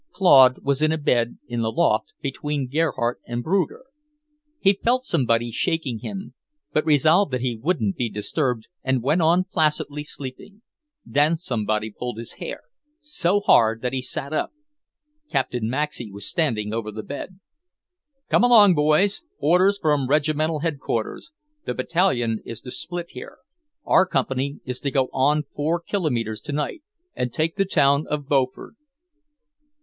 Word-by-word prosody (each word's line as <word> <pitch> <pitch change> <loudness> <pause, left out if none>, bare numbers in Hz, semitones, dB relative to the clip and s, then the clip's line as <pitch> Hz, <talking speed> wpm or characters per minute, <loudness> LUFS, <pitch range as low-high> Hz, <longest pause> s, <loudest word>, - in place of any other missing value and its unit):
Claude 135 -9 +6
was 140 +1 0
in 155 0 +3
a 160 - 0
bed 120 -5 +1
in 120 -1 -3
the 110 0 0
loft, 110 -1 +1
between 140 0 -3
Gerhardt 125 -7 -1
and 120 0 -3
Bruger. 185 - 0 0.8
He 195 0 +4
felt 255 +2 +2
somebody 120 - +1
shaking 145 -3 -1
him, 195 - -7 0.4
but 155 +1 +1
resolved 155 +4 +4
that 125 - -1
he 125 -2 -1
wouldn't 115 - -1
be 120 -2 -1
disturbed 115 +2 -2 0.2
and 130 -2 0
went 155 +7 +2
on 170 +3 +4
placidly 150 -4 -1
sleeping. 145 - -8 0.4
Then 150 +3 +2
somebody 110 -8 -2
pulled 120 +2 -6
his 115 0 -7
hair, - - -5 0.4
so 205 - 0
hard 115 - +4
that 125 - -1
he 130 - -1
sat 135 +3 -5
up. - - -1 0.8
Captain 125 -4 -1
Maxey 130 -4 -3
was 100 0 -7
standing 110 -10 -1
over 110 -1 -3
the 110 0 -7
bed. 180 - -7 0.9
"Come - - +3
along, 220 -6 +7
boys. 155 - +2 0.2
Orders 185 +5 +3
from 150 -6 +1
Regimental 155 +1 +1
Headquarters. 150 - -3 0.3
The - - -3
Battalion 125 - +1
is 115 - -7
to 125 - -8
split 175 +4 -5
here. - - -10 0.5
Our 190 - +4
Company 135 -2 -1
is 125 -1 -4
to 140 - -2
go 130 -1 +1
on 145 +3 +2
four 160 +4 0
kilometers 125 - -2
tonight, 150 - -3 0.3
and 125 -1 -2
take 160 +6 -1
the 195 0 +1
town 145 -4 +3
of 145 -2 -3
Beaufort." 130 -3 0
145 Hz, 150 wpm, -23 LUFS, 120-165 Hz, 0.9 s, along